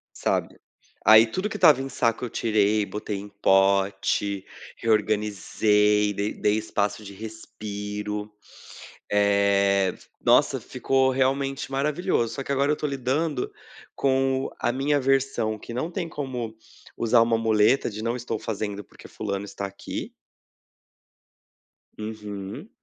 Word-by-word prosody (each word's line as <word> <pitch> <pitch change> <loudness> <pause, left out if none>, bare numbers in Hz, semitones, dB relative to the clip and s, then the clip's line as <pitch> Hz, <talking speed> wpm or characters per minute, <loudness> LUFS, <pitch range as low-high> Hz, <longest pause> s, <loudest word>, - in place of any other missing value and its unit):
Sabe, - - -1 0.5
aí 110 +1 +9
tudo 185 - -3
que - - -5
estava 145 -3 +6
em 135 - -5
saco 115 -2 0
eu - - -5
tirei, 105 -2 +1
botei 105 0 -4
em 100 +1 -7
pote, 100 0 +2 0.3
reorganizei, 105 -1 +2
dei 100 +1 -2
dei 105 0 +1
espaço 105 -1 -2
de 100 0 -9
respiro. 105 -1 -6 0.8
Eh, 100 -2 +3 0.3
nossa, - - +4
ficou 135 0 +1
realmente 135 +1 0
maravilhoso, 140 -3 0
só 135 - -4
que 140 - -5
agora 140 +1 +2
eu - - +4
estou 150 0 -2
lidando 140 +1 -1 0.4
com 135 0 +1
a - - +1
minha 140 +3 +1
versão 135 -5 +1
que 115 - -9
não 145 +8 -3
tem 175 -1 -3
como 125 -7 -5 0.4
usar 115 0 +4
uma 115 0 +3
muleta 110 +4 +3
de: 110 0 -7
"Não 115 +1 -1
estou 120 -2 -3
fazendo, 105 -1 -4
porque - - -15
fulano 100 -1 -4
está 100 0 -5
aqui". 100 0 -6 1.9
Uhum. 105 - -7
110 Hz, 130 wpm, -25 LUFS, 105-135 Hz, 1.9 s, aí